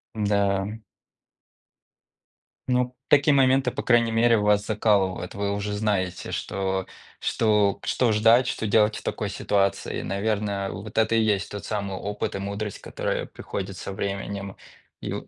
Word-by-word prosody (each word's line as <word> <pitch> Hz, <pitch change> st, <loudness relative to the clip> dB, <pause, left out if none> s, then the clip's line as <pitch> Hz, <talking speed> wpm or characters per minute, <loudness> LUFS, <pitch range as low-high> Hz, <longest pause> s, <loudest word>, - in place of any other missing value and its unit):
М-да, 100 Hz, -2 st, +1 dB
м. 110 Hz, +1 st, -8 dB, 1.8 s
Ну, 125 Hz, 0 st, +1 dB
такие 145 Hz, +1 st, +5 dB
моменты, 130 Hz, -1 st, +4 dB
по 140 Hz, +3 st, -4 dB
крайней 115 Hz, -2 st, +3 dB
мере, 115 Hz, 0 st, +4 dB
вас 105 Hz, -1 st, +2 dB
закалывают. 100 Hz, -4 st, +1 dB
Вы 100 Hz, 0 st, -1 dB
уже 100 Hz, 0 st, -3 dB
знаете, 100 Hz, -4 st, -1 dB
что 95 Hz, -1 st, -2 dB, 0.3 s
что 105 Hz, -3 st, +2 dB
к -, -, -10 dB
что 120 Hz, -3 st, +2 dB
ждать, 115 Hz, +4 st, +5 dB
что 115 Hz, -, -2 dB
делать 105 Hz, +1 st, +3 dB
в -, -, -7 dB
такой -, -, -3 dB
ситуации. 100 Hz, -1 st, 0 dB
И -, -, -5 dB
наверное, 100 Hz, -1 st, -1 dB
вот 105 Hz, +1 st, -8 dB
это 110 Hz, 0 st, +3 dB
и 115 Hz, -, +4 dB
есть 105 Hz, -3 st, 0 dB
тот 105 Hz, -, -6 dB
самый 100 Hz, -3 st, -3 dB
опыт 105 Hz, +1 st, -3 dB
и -, -, -3 dB
мудрость, 100 Hz, +1 st, -4 dB
которая -, -, -3 dB
приходит -, -, -6 dB
со -, -, -6 dB
временем 100 Hz, 0 st, -4 dB, 0.5 s
и -, -, -4 dB
в -, -, -5 dB
105 Hz, 155 wpm, -25 LUFS, 100-115 Hz, 1.8 s, такие